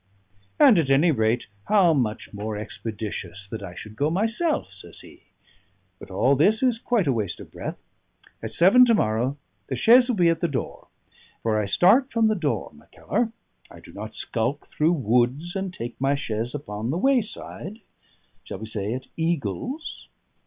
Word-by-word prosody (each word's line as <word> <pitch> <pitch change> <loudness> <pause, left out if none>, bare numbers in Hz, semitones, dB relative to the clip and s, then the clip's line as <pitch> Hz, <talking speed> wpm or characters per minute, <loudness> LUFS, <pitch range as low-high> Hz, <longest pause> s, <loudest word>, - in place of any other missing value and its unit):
"And, 260 - +7
at 145 -4 0
any 145 +5 +4
rate, 115 -2 +1 0.2
how 195 -6 +4
much 115 -8 -2
more 105 +1 -4
expeditious 105 -1 -6
that 110 +2 -7
I 90 -3 -8
should 110 +3 -9
go 145 +6 +1
myself!" 225 - 0
says 90 -4 -11
he. - - -16 0.8
"But - - -12
all 125 +9 +2
this 205 - +3
is 245 -3 +2
quite 235 -6 +1
a 135 - +2
waste 105 -7 -2
of - - -12
breath. - - -6 0.6
At 110 - -5
seven 190 - +6
to 230 -2 +4
morrow 120 - 0 0.3
the 130 - -3
chaise 245 - +6
will 245 - +1
be 175 -4 +4
at 165 -1 +1
the 170 - +1
door. 135 -6 -5 0.6
For 110 -1 +1
I 100 - -3
start 215 - +4
from 230 -3 +1
the 215 0 +3
door, 160 -7 -2
Mackellar; 230 -2 -3 0.4
I - - -13
do - - -15
not 110 +2 -8
skulk 120 +6 -2
through 160 +3 +2
woods 130 - 0
and 190 -1 -3
take 120 -7 -7
my 135 +1 +2
chaise 115 -1 -3
upon 110 -5 -5
the 155 - -1
wayside 225 -3 -2 0.6
shall - - -7
we 110 - -7
say, 105 0 -3
at 130 - -7
Eagles?" 165 - -3
140 Hz, 175 wpm, -24 LUFS, -, 0.8 s, And